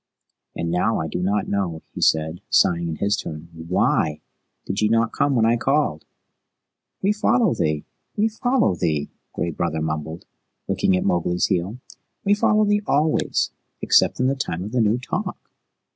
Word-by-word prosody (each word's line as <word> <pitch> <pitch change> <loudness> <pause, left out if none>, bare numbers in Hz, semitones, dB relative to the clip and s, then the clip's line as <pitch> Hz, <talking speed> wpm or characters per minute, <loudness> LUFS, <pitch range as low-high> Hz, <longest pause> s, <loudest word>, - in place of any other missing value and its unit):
"And 85 0 -2
now 95 +6 +1
I 80 - -2
do 90 - -3
not 100 +3 0
know," 95 -6 -2
he - - -6
said, 80 +2 +2
sighing 85 -1 +3
in 80 - -3
his 100 +5 +1
turn. 80 -3 -7
"WHY 80 -2 0 0.5
did 95 +2 -2
ye 105 - +3
not 115 0 +2
come 140 -1 +1
when 115 -2 +3
I 115 +1 +3
called?" 135 - 0 1.0
"We 200 +2 +3
follow 220 0 +2
thee 75 -1 -1 0.3
we 210 +2 +3
follow 240 - +1
thee," 75 -4 -1 0.2
Gray 85 - -2
Brother 80 0 -2
mumbled, 80 +1 -4 0.4
licking 95 - +2
at - - -2
Mowgli's 90 0 +1
heel. 95 +7 -1 0.5
"We 205 - +3
follow 215 +1 +3
thee 205 0 +2
always, 150 +2 +1 0.3
except - - +3
in 125 - +2
the 135 - +3
Time 90 -10 -3
of 105 - -6
the 125 -1 +1
New 110 +2 +3
Talk." 125 - -4
95 Hz, 170 wpm, -22 LUFS, 80-135 Hz, 1.0 s, sighing